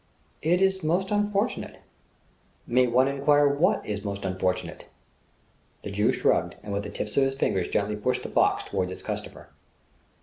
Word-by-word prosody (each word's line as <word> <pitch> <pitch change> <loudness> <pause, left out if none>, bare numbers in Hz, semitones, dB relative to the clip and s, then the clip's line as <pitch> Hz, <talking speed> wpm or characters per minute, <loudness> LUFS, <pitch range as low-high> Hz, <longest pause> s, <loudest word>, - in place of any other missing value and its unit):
"It 175 +4 +2
is 190 0 +2
most 180 +5 0
unfortunate..." 205 -1 -1 0.9
"May 125 +1 +3
one 125 +2 +3
enquire 145 +1 +3
what 140 +4 +2
is 105 -1 -4
most 100 -1 -4
unfortunate?" 95 -1 -2 1.0
The - - -5
Jew - - +2
shrugged - - +1
and 100 - -5
with 100 - -1
the - - -5
tips 105 - -5
of 140 - +5
his 135 0 0
fingers 95 -9 0
gently 105 +1 -1
pushed 105 - -1
the - - -5
box - - +2
toward 95 -2 -2
his 95 - -8
customer. - - -6
130 Hz, 165 wpm, -26 LUFS, 100-160 Hz, 1.0 s, of